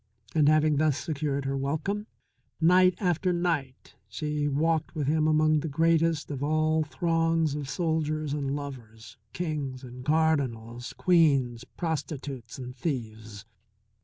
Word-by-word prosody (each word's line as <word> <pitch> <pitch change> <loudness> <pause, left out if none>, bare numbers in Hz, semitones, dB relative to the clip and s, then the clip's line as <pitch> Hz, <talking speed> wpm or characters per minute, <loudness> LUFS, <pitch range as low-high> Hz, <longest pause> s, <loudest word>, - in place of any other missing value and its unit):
And, 150 -2 +4
having 155 -1 +3
thus 150 -2 +2
secured 140 -3 -2
her 135 0 -1
welcome, 155 +10 -2 0.5
night 180 +2 +5
after 180 -1 +1
night 165 -7 -2 0.2
she 150 +7 -2
walked 155 +3 0
with 150 -3 -1
him 155 +2 +2
among 155 0 +3
that 160 - -4
greatest 165 0 +2
of 140 -2 -4
all 155 +1 +2
throngs 165 -1 +1
of 145 -2 -4
soldiers 155 -3 -1
and 140 -1 -2
lovers, 120 -6 -9
kings 145 -6 -4
and 125 0 -9
cardinals, 130 -6 0
queens, 140 -9 +2
prostitutes 140 -7 -4
and 125 -1 -7
thieves. 110 -7 -5
150 Hz, 130 wpm, -28 LUFS, 135-160 Hz, 0.5 s, night